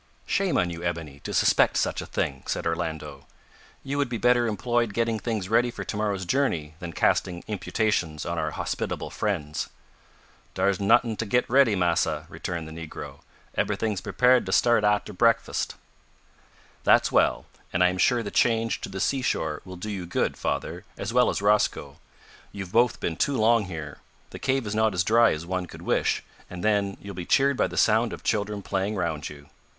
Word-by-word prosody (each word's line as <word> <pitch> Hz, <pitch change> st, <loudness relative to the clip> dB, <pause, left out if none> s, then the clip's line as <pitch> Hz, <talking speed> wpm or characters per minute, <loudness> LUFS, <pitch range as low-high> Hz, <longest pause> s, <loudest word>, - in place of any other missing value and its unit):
"Shame 195 Hz, -3 st, +1 dB
on 90 Hz, -1 st, +1 dB
you, 85 Hz, 0 st, -7 dB
Ebony, 80 Hz, -5 st, -4 dB
to -, -, -6 dB
suspect -, -, +3 dB
such -, -, 0 dB
a -, -, -8 dB
thing!" 65 Hz, -1 st, -2 dB
said -, -, -2 dB
Orlando. 80 Hz, -4 st, -4 dB, 0.6 s
"You 140 Hz, +1 st, -2 dB
would 140 Hz, -3 st, +1 dB
be 120 Hz, -, -2 dB
better 120 Hz, 0 st, +3 dB
employed 115 Hz, 0 st, 0 dB
getting 115 Hz, -1 st, 0 dB
things 110 Hz, -4 st, -3 dB
ready 115 Hz, +4 st, +3 dB
for 120 Hz, -, -6 dB
to -, -, -5 dB
morrow's 100 Hz, -3 st, -1 dB
journey 85 Hz, -, 0 dB
than 85 Hz, -1 st, -6 dB
casting 90 Hz, +2 st, +1 dB
imputations 100 Hz, -6 st, -1 dB
on -, -, -2 dB
our -, -, -1 dB
hospitable -, -, -3 dB
friends." 80 Hz, -8 st, -2 dB, 0.9 s
"Dar's 100 Hz, -2 st, +1 dB
not'ing 110 Hz, +3 st, +3 dB
to 115 Hz, -, -2 dB
git 125 Hz, +4 st, +2 dB
ready, 130 Hz, -4 st, +4 dB
massa," 90 Hz, -3 st, +1 dB
returned 85 Hz, -3 st, -5 dB
the -, -, -9 dB
negro. 80 Hz, 0 st, -8 dB, 0.4 s
"Eberyting's 105 Hz, -4 st, -1 dB
prepared 125 Hz, 0 st, +3 dB
to -, -, -2 dB
start 120 Hz, +2 st, +4 dB
arter 105 Hz, 0 st, +1 dB
breakfust." 115 Hz, +4 st, +1 dB, 1.1 s
"That's -, -, +4 dB
well, -, -, +2 dB, 0.3 s
and 90 Hz, -, +2 dB
I 90 Hz, -, +5 dB
am 90 Hz, 0 st, -4 dB
sure 120 Hz, +2 st, +3 dB
the 100 Hz, -, -5 dB
change 115 Hz, -1 st, +1 dB
to -, -, -5 dB
the 95 Hz, 0 st, -6 dB
seashore 90 Hz, -, 0 dB
will 95 Hz, -1 st, -8 dB
do 105 Hz, +4 st, -5 dB
you 95 Hz, -4 st, -5 dB
good, -, -, 0 dB
father, -, -, -3 dB
as 115 Hz, -, -4 dB
well 125 Hz, 0 st, +4 dB
as -, -, -2 dB
Rosco. 105 Hz, +1 st, +1 dB, 0.5 s
You've 95 Hz, -3 st, -7 dB
both 120 Hz, +2 st, +3 dB
been 80 Hz, -, -2 dB
too 140 Hz, -2 st, +1 dB
long 110 Hz, 0 st, +4 dB
here. 80 Hz, -6 st, -7 dB, 0.3 s
The -, -, -8 dB
cave 135 Hz, -2 st, 0 dB
is 105 Hz, -, -3 dB
not 110 Hz, -2 st, +2 dB
as 85 Hz, -, +2 dB
dry 115 Hz, +4 st, +5 dB
as 75 Hz, +2 st, -3 dB
one 90 Hz, 0 st, -3 dB
could -, -, -11 dB
wish -, -, +1 dB, 0.3 s
and, 90 Hz, -1 st, -7 dB
then, 100 Hz, -2 st, +1 dB
you'll 100 Hz, 0 st, -8 dB
be 90 Hz, -1 st, -5 dB
cheered 140 Hz, +9 st, +3 dB
by -, -, +2 dB
the -, -, -8 dB
sound 115 Hz, +1 st, +3 dB
of -, -, -8 dB
children 105 Hz, -1 st, -1 dB
playing 100 Hz, +2 st, -1 dB
round 85 Hz, -6 st, -2 dB
you." 75 Hz, -1 st, -12 dB
100 Hz, 190 wpm, -26 LUFS, 85-115 Hz, 1.1 s, I